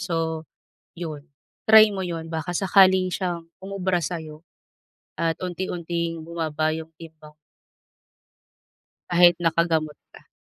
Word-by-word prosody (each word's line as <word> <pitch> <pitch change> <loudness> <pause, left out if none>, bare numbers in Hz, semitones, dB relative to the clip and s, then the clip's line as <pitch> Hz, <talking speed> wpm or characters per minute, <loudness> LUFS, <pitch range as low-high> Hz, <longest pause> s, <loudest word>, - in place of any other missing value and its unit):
So, 165 -3 -2 0.5
yun 160 -3 -7 0.4
try 220 0 +9
mo 190 -1 -3
yun 165 -2 -5
baka 160 +1 -4
sakali 190 0 +4
siyang 175 -3 -3 0.2
umubra 190 -2 -1
sayo 160 -2 -6 0.8
at 165 -1 +1
unti-unting 170 -2 -3
bumaba 160 -2 -2
yung 160 0 -9
timbang. 155 -2 -13 1.7
Kahit 175 -1 +6
nakagamot 165 -2 +1 0.2
ka. - - -17
170 Hz, 105 wpm, -24 LUFS, 160-180 Hz, 1.7 s, try